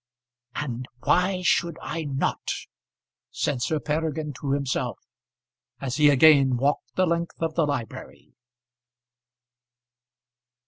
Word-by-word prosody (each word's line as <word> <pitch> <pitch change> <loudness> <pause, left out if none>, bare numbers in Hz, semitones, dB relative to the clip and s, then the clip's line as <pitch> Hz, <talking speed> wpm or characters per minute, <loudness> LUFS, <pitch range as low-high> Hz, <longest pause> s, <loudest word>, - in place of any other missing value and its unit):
"And 130 -3 -4 0.2
why 185 0 +2
should 170 -2 +2
I 165 -1 -4
not?" 135 -1 -2 0.8
said 135 -4 -2
Sir 155 +5 0
Peregrine 155 0 -2
to 140 -1 -1
himself, 140 -2 -1 0.8
as 135 0 -3
he 150 -1 +6
again 140 -2 +6
walked 140 +4 -1
the 185 - +3
length 170 0 -2
of 165 -1 -1
the 160 -2 +1
library. 135 -6 -6
150 Hz, 105 wpm, -25 LUFS, 135-165 Hz, 0.8 s, he